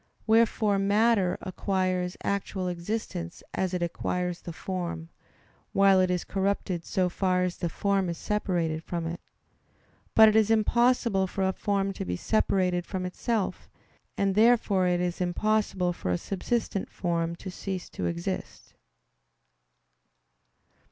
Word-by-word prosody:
Wherefore 220 -2 +3
matter 200 -2 +3
acquires 185 -1 -1
actual 195 -1 -2
existence 175 -1 -4
as 190 -1 -1
it 180 -2 -1
acquires 180 +1 -2
the 170 - -7
form; 170 -2 -4 0.6
while 195 -1 +5
it 185 0 +3
is 180 -1 0
corrupted 190 -3 -1
so 185 -1 +1
far 180 0 +1
as 180 -1 -2
the 170 - -2
form 195 +1 0
is 170 - -3
separated 170 -6 -1
from 170 -1 -3
it. 170 +1 -4 1.0
But 220 0 +9
it 215 - +4
is 220 -1 +4
impossible 225 -2 +3
for 190 +1 -1
a 190 - 0
form 195 -1 -1
to - - -5
be 90 -1 -2
separated 180 - +1
from 185 -1 -3
itself; 195 +1 -2 0.5
and 195 -1 +2
therefore 215 -3 +4
it 175 0 +1
is 180 0 -2
impossible 185 0 +1
for 130 - -5
a 90 - +2
subsistent 200 - -2
form 170 -2 -1
to 185 +2 -8
cease 185 -1 -5
to 90 - -3
exist. 85 0 -5
185 Hz, 140 wpm, -28 LUFS, 175-200 Hz, 1.0 s, But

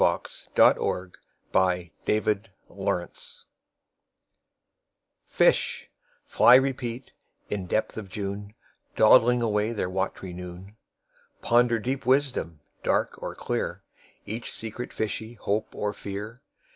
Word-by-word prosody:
PR - - +2
6003 90 0 +2 0.4
R4N5 90 -2 +2 0.2
Robarts 105 0 +1 0.3
Library 85 -1 -1 2.2
1Fish - - +2 0.4
(fly 120 - +6
replete, 130 -2 0 0.4
in 100 -3 -3
depth 110 - 0
of 105 -3 -6
June,2Dawdling 105 +4 +2
away 105 0 +1
their 95 -4 -2
wat'ry 95 -1 -3
noon)3Ponder 105 +5 -2
deep 130 -1 -3
wisdom, 130 - +1 0.2
dark - - 0
or - - -5
clear,4Each 110 +3 -5
secret 115 +2 -6
fishy 110 +1 -3
hope 105 0 -2
or 105 0 -2
fear. 105 +5 -7
105 Hz, 95 wpm, -26 LUFS, 95-120 Hz, 2.2 s, fly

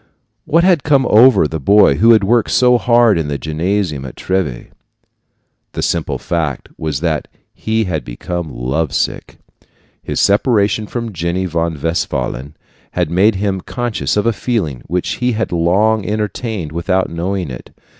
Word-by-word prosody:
What 165 +2 +3
had 180 -5 +4
come 140 -2 +2
over 110 -5 +5
the 80 +1 -4
boy 100 +9 +4
who 115 +2 +6
had 110 -3 +4
worked 115 +2 +2
so 125 -1 +4
hard 120 -6 +4
in 80 - -2
the 70 -1 -2
gymnasium 80 0 -2
at 65 - -8
Treves? 90 -11 -3 1.0
The - - -3
simple - - -1
fact 80 -6 -3
was 75 -3 -3
that 80 -3 -1 0.3
he 110 0 -1
had 80 -8 -3
became 85 +8 -5
love 65 +4 -2
sick. - - -2 0.6
His - - -3
separation 105 0 +2
from 115 -2 -5
Jenny 85 +2 -2
von 85 -2 -2
Westphalen 75 -3 -3 0.4
had 85 -3 -1
made 100 +5 +3
him 95 -1 -1
conscious 120 -1 -2
of 105 - +1
a 115 - +2
feeling 95 - -2
which 90 0 -2
he 125 0 0
had 110 +1 -2
long 100 +6 +2
entertained 105 -4 -3
without 90 +3 -1
knowing 90 -1 -3
it. 60 - -9
95 Hz, 155 wpm, -16 LUFS, 80-110 Hz, 1.0 s, who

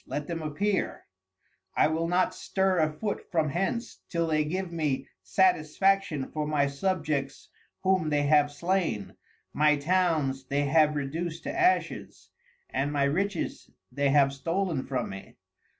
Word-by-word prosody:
Let 145 - -3
them 165 0 -4
appear, 190 +6 -1 0.7
I - - +4
will 160 +2 0
not 180 +2 +2
stir 190 -2 0
a 155 -1 +2
foot 205 +7 -4
from 160 -3 +1
hence 195 - -2
till 170 -1 0
they 155 -1 +1
give 180 +4 -3
me 155 -5 -1
satisfaction 185 -3 +2
for 150 -1 -2
my 150 -2 +2
Subjects 145 -2 -2 0.3
whom 185 -4 +2
they 145 -1 +2
have 145 0 +4
slain, 145 - -1 0.4
my 150 0 +4
Towns 150 -4 +1
they 140 +2 0
have 150 +1 +4
reduc'd 160 +4 -3
to 295 - -3
Ashes, 365 +1 0 0.4
and 140 +2 -1
my 145 -1 +1
Riches 175 +6 -1 0.2
they 140 +2 +1
have 140 -1 +4
stoln 165 0 -2
from 130 -5 -2
me. 95 0 -10
155 Hz, 145 wpm, -28 LUFS, 145-185 Hz, 0.7 s, I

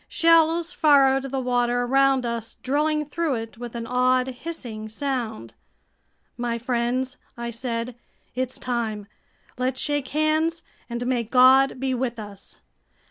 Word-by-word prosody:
Shells 330 0 +3
furrowed 270 -3 +4
the 270 +1 -2
water 245 -1 +1
around 270 0 +3
us, 230 -1 -4
drilling 300 +3 +1
through 310 -1 -1
it 225 0 -7
with 240 -1 -7
an 230 -1 -4
odd 255 +1 +2
hissing 245 -6 -7
sound. 230 - -4 0.8
"My 240 -1 -2
friends," 245 +2 -1 0.2
I 235 0 -4
said, 235 0 -3 0.4
"it's 255 0 -3
time. 225 -4 -3 0.5
Let's 260 +1 -1
shake 290 -2 -1
hands, 310 +3 0 0.3
and 235 +1 -3
may 250 -1 +1
God 260 +3 +5
be 265 0 -1
with 245 -1 -2
us!" 205 -2 -10
255 Hz, 135 wpm, -24 LUFS, 235-275 Hz, 0.8 s, God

